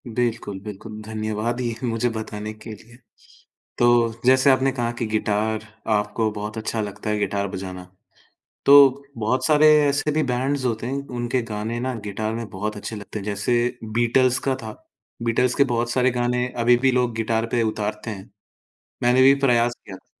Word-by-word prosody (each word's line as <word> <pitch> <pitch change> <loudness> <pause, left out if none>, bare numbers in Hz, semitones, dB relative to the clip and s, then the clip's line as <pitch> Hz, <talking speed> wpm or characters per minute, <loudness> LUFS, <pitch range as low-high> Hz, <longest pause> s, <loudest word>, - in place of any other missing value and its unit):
बिल्कुल, 115 -4 -2
बिल्कुल, 105 +1 -8
धन्यवाद 110 +2 -3
ये 120 -2 -2
मुझे 115 +1 0
बताने 110 -1 -5
के 110 +2 -12
लिए। 115 +3 -15 0.8
तो, 120 -1 +4
जैसे 130 +1 +5
आपने 135 0 +3
कहा 120 -2 -2
कि 115 - -1
गिटार 110 0 -1 0.3
आपको 105 +1 0
बहुत 105 +1 -6
अच्छा 110 +1 -2
लगता 105 0 -4
है 105 - 0
गिटार 100 -1 -1
बजाना, 95 -1 -7 0.8
तो 140 -1 +7
बहुत 115 +4 0
सारे 155 0 +5 0.2
ऐसे 145 +2 0
भी 155 +1 +1
बैंड्स 130 +2 -1
होते 115 -2 -1
हैं, 130 - -2
उनके 120 0 -2
गाने 110 +3 -3
ना 130 +1 -2
गिटार 110 +2 -3
में 115 -1 -5
बहुत 105 +3 -4
अच्छे 105 +2 -6
लगते 105 +1 -7
हैं, 100 - -7
जैसे 120 +4 0
बीटल्स 120 +3 +2
का 135 - +2
था, - - -6 0.5
बीटल्स 120 +2 +1
के 140 - +4
बहुत 120 0 -1
सारे 130 +1 +2
गाने 125 0 0 0.2
अभी 120 +1 +5
भी 130 +2 +2
लोग 125 -2 +1
गिटार 115 0 0
पे 120 -1 +2
उतारते 110 0 -3
हैं। 95 -3 -9 0.7
मैंने 125 +1 +4
भी 135 +1 +7
प्रयास 120 -2 +3
किया 95 - -9
था, 95 - -22
115 Hz, 175 wpm, -23 LUFS, 105-125 Hz, 0.8 s, तो